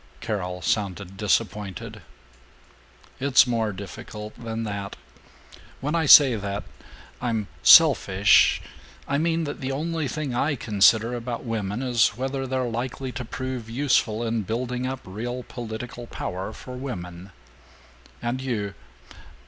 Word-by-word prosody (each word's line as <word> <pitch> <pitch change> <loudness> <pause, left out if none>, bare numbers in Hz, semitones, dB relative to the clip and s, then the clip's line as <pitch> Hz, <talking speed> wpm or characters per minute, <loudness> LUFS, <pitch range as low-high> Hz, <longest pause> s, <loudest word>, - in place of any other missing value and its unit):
Carol 90 -4 -4
sounded 95 +1 -2
disappointed. 105 -2 -2 1.2
"It's 135 -1 +5
more 115 -3 0
difficult 105 +2 -8
than 115 -1 -5
that. 100 -2 -5 0.8
When 150 +3 -2
I 165 -3 +1
say 135 -4 +9
that 100 -1 -4 0.6
I'm 115 -4 -1 0.2
selfish 105 - +6 0.4
I 140 +1 0
mean 165 +1 +1
that 145 -2 -5
the 130 0 -2
only 160 +2 -2
thing 140 +1 -3
I 145 +5 +1
consider 110 +1 +3
about 120 0 -4
women 110 -1 -3
is 120 -4 +2
whether 135 +1 -3
they're 130 0 -1
likely 125 +3 -4
to 125 - -5
prove 125 -1 -5
useful 120 -3 +1
in 115 -1 -1
building 125 +4 -3
up 130 0 -4
real 120 +6 -5
political 120 0 -7
power 95 0 -5
for 125 +3 -10
women. 90 -8 -7 0.9
And 120 +2 -2
you? 105 -6 -3
120 Hz, 125 wpm, -25 LUFS, 105-130 Hz, 1.2 s, say